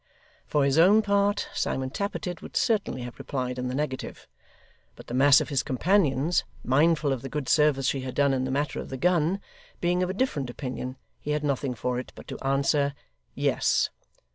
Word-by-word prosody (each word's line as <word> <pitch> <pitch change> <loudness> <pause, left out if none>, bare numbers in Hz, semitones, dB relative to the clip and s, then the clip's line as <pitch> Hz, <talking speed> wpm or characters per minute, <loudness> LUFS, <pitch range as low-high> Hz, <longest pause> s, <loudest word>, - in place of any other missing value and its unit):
For 145 -2 +2
his 140 +3 +3
own 205 +6 +6
part, 200 0 +1
Simon 130 0 -2
Tappertit 190 -2 -4
would - - -6
certainly 205 - 0
have 120 0 -9
replied 125 -2 -3
in 125 - -2
the 125 - -3
negative, 140 -2 -4 0.7
but - - -13
the - - -8
mass 135 +2 +6
of - - -3
his 140 -3 +1
companions, 155 +1 +2 0.2
mindful 150 +2 +3
of 130 - -4
the 135 - -6
good 150 -3 -4
service 150 -3 +3
she 135 +1 0
had 130 -1 -6
done 140 -1 +3
in 130 -1 0
the 130 - -2
matter 140 +2 -1
of - - -7
the 130 - -5
gun, 175 +3 +2 0.4
being 180 +1 +1
of 180 - 0
a - - -1
different 155 - -1
opinion, 130 0 -5 0.2
he - - -8
had 150 0 -1
nothing 140 -2 -1
for 125 +3 -2
it 130 - -8
but - - -12
to - - -6
answer, 140 +1 +1 0.4
Yes. - - +1
140 Hz, 195 wpm, -27 LUFS, 130-170 Hz, 0.7 s, own